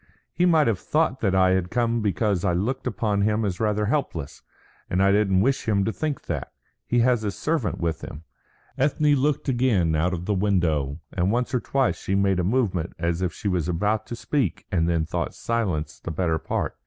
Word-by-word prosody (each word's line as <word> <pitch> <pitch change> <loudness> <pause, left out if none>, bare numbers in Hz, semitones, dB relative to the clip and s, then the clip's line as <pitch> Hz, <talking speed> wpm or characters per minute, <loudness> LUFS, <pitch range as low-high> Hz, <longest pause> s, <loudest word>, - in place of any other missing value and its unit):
"He 180 +2 +2
might 160 -3 +4
have 110 -7 +1
thought 150 -4 0
that 95 -3 +1
I 95 0 +4
had 95 -1 +1
come 115 0 0
because 100 -2 0
I 90 -3 +2
looked 125 +10 -1
upon 105 -4 0
him 105 +1 +1
as 90 -3 -2
rather 105 -1 +1
helpless, 100 - -2 0.5
and 90 - 0
I 100 0 +4
don't 100 -2 +3
wish 135 +2 0
him 100 -2 +2
to 110 - -1
think 155 -3 -3
that. 75 -7 -4 0.3
He 120 0 +2
has 120 -1 +3
his 105 -2 -3
servant 150 - -1
with 85 -3 -2
him." 75 - -8 0.6
Ethne 145 +2 +3
looked 145 +1 +1
again 120 -11 +2
out 80 +4 +1
of 90 -1 -4
the 105 - 0
window, 85 -8 0
and 90 +2 +1
once 125 +3 -1
or 125 - +2
twice 135 +1 0
she 95 - -1
made 100 -2 +2
a - - +1
movement 95 -5 0
as 85 +1 -1
if 90 - 0
she - - -5
was 90 -3 0
about 105 +5 0
to 120 - -5
speak 125 - -1
and 85 -2 +1
then 85 -2 +1
thought - - -3
silence 100 -10 -2
the - - -6
better 80 -1 0
part. - - -3
100 Hz, 210 wpm, -24 LUFS, 90-120 Hz, 0.6 s, might